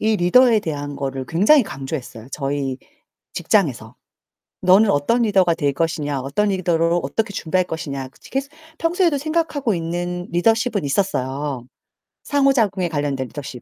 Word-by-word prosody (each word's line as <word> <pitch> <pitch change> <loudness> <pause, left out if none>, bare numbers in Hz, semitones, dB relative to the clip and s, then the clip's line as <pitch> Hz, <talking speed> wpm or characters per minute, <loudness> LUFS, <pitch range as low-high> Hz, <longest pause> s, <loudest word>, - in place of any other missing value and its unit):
이 220 0 +2
리더에 225 +6 +5
대한 145 -5 -5
거를 135 -1 -4
굉장히 210 - +5
강조했어요, 135 - -7
저희 140 -2 -2 0.6
직장에서. - - 0 0.7
'너는 190 +4 +5
어떤 215 +12 +2
리더가 190 -6 +3
될 145 -4 0
것이냐, 145 -3 -2
어떤 140 +11 0
리더로 170 -2 +1
어떻게 200 +10 -2
준비할 185 +3 0
할 - - -18
것이냐?' 140 -5 -5 0.2
계속 275 +1 -2 0.3
평소에도 335 -3 +1
생각하고 310 -6 -1
있는 175 +1 -3
리더십은 225 - +1
있었어요. 140 -5 -2 0.6
상호작용에 240 -10 +2
관련된 145 -4 -2
리더십. 130 -3 -8
175 Hz, 350 characters per minute, -21 LUFS, 145-220 Hz, 0.7 s, 리더에